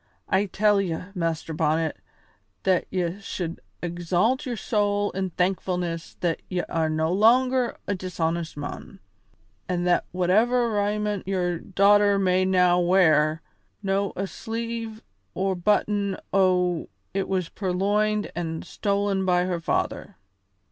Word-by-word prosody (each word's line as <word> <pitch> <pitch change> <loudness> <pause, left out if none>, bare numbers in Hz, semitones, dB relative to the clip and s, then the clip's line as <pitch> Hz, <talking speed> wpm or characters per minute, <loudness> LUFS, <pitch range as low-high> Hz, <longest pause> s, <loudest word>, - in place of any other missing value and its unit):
I 195 +1 +2
tell 205 +1 +3
ye, 170 -4 -2 0.2
Master 165 -3 -2
Bonnet, 160 0 0 0.7
that 185 -2 +2
ye 180 0 -2
should 175 -4 -5 0.2
exalt 175 - 0
your 240 -2 -3
soul 205 -1 0
in 190 0 -2
thankfulness 180 -2 -2
that 170 -2 0
ye 180 -1 0
are 160 -1 -1
no 160 +2 0
longer 250 +4 +3
a 205 - -1
dishonest 170 -4 -3
mon, 145 0 -7 0.7
an' 175 -1 0
that 175 0 +2
whatever 225 +7 +2
raiment 210 -1 -1
your 180 -3 0
daughter 200 +2 +4
may 185 -1 +2
now 180 -1 +4
wear, 160 -4 +3 0.4
no' 195 0 0
a 195 - -2
sleeve 225 +2 -5 0.3
or 190 +1 0
button 200 +1 +1 0.2
o' 180 -3 +2 0.2
it 195 0 -1
was 185 -3 -1
purloined 205 +3 0
an' 165 -2 -3
stolen 200 -1 -1
by 180 -1 +2
her 180 -2 -1
father." 165 - -2
185 Hz, 125 wpm, -25 LUFS, 175-205 Hz, 0.7 s, daughter